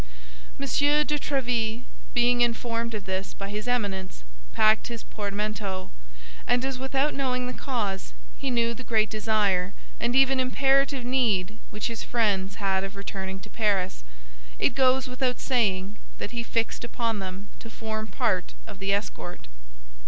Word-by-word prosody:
M. - - -1
de 295 +1 +3
Tréville, 245 -5 0 0.3
being 245 0 +4
informed 235 -1 0
of 210 - -5
this 190 0 -3
by 195 0 -5
his 210 +3 -4
Eminence, 195 - -1 0.3
packed 215 0 +4
his 235 -1 -6
portmanteau; 205 -2 -3 0.6
and 245 +1 +3
as 265 -1 -2
without 270 +2 +1
knowing 255 -2 0
the 250 - -3
cause 205 - -2 0.2
he 275 - -2
knew 235 -1 +2
the 245 +3 -8
great 220 -3 +2
desire 205 -4 +1 0.2
and 240 +1 +1
even 270 0 +5
imperative 270 0 +3
need 220 -6 +2
which 210 - -4
his 230 -1 -2
friends 200 -5 +1
had 195 -2 +1
of 195 +1 -5
returning 190 -1 -4
to - - -11
Paris, 195 - 0 0.5
it - - +2
goes 265 -1 +3
without 255 -1 -1
saying 205 -6 +1 0.2
that - - -4
he 240 -1 -2
fixed 230 0 -1
upon 230 -2 -1
them 190 +1 -6
to 230 - -9
form 220 -1 -4
part - - 0
of - - -10
the 195 0 0
escort. 200 - -3
225 Hz, 150 wpm, -27 LUFS, 200-250 Hz, 0.6 s, even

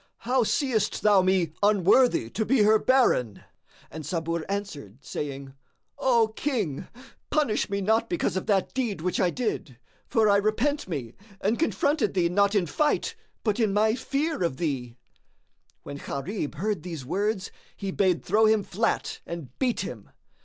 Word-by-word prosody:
How 255 +2 +2
seest 230 -3 0
thou 205 -2 +6
me 185 -4 +1
unworthy 205 - +4
to 220 - -1
be 240 -1 +3
her 215 +1 +5
baron?" 210 - +2 0.5
And 160 +1 -7
Sabur 165 0 -2
answered, 160 - -5
saying, 135 -2 -5 0.5
"O 235 -4 +3
King, 210 - -2 0.4
punish 290 -10 +1
me 200 0 -1
not 220 +4 +1
because 345 - -1
of 190 - -3
that 195 -3 +1
deed 235 -10 -2
which 180 +1 -1
I 180 - +3
did; 175 - -3 0.3
for 220 -2 +3
I 200 -1 +5
repent 225 +8 0
me 130 -10 -5 0.3
and 215 +4 0
confronted 285 - +1
thee 175 -2 +2
not 200 +3 +2
in 195 -4 +3
fight 295 - 0 0.3
but 210 0 0
in 215 -4 +2
my 215 +1 +3
fear 290 - -2
of 170 -7 0
thee."[FN#64] 130 -7 -3 0.9
When 140 - -7
Gharib 150 +4 -4
heard 200 +1 -2
these 165 -6 -7
words 200 - -1 0.3
he 195 -2 -4
bade 185 -3 +1
throw 215 +4 +4
him 215 -1 +3
flat 220 +5 -1
and 165 -7 -7
beat 250 -3 +1
him. - - -7
200 Hz, 160 wpm, -26 LUFS, 170-225 Hz, 0.9 s, thou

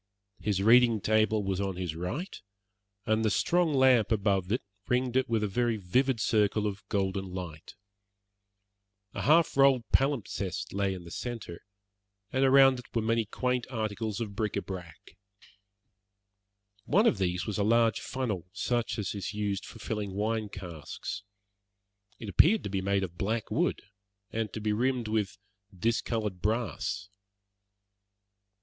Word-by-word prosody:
His 100 -2 0
reading 115 0 +6
table 110 0 +2
was 95 0 -1
on 95 -2 -2
his 90 -3 -4
right, 115 - -4 0.7
and 110 0 +1
the 110 - +3
strong 170 - +2
lamp 130 -5 +4
above 100 -3 +1
it 120 - 0 0.2
ringed 125 0 0
it 130 -2 +2
with 115 -2 +1
a - - +1
very 115 +3 0
vivid 125 +6 +1
circle 105 -1 +2
of 105 -1 -3
golden 95 -1 -1
light. 85 -4 -7 1.4
A - - -4
half 160 +3 +4
rolled 135 -3 +5
palimpsest 105 -7 0
lay 100 -1 0
in 90 - -8
the 85 - -11
centre, 115 -8 -6 0.7
and 130 +1 +2
around 135 -1 +6
it 125 - -11
were 115 - +1
many 115 0 +1
quaint 125 +3 -1
articles 110 -2 -3
of 105 -4 -4
bric 105 0 -1
a 100 - -1
brac. 90 -5 -9 1.7
One 205 +9 +3
of 120 - +3
these 90 -1 0
was 105 -2 -3
a - - +2
large 115 +1 +3
funnel, 105 -10 -3
such 120 +2 -1
as 105 -4 -2
is 100 0 -5
used 100 -2 -2
for - - -11
filling 105 -3 -4
wine 110 +1 -1
casks. 90 +1 -7 1.0
It 110 - -8
appeared 185 - +4
to 100 - -4
be 95 -1 -1
made 100 0 +1
of 85 -2 -6
black 110 +2 -2
wood, - - 0 0.5
and 110 -2 -2
to - - -5
be 105 0 0
rimmed 125 +1 0
with 105 -3 -1 0.4
discoloured 110 -2 -1
brass. 110 -3 -1
110 Hz, 150 wpm, -29 LUFS, 100-120 Hz, 1.7 s, reading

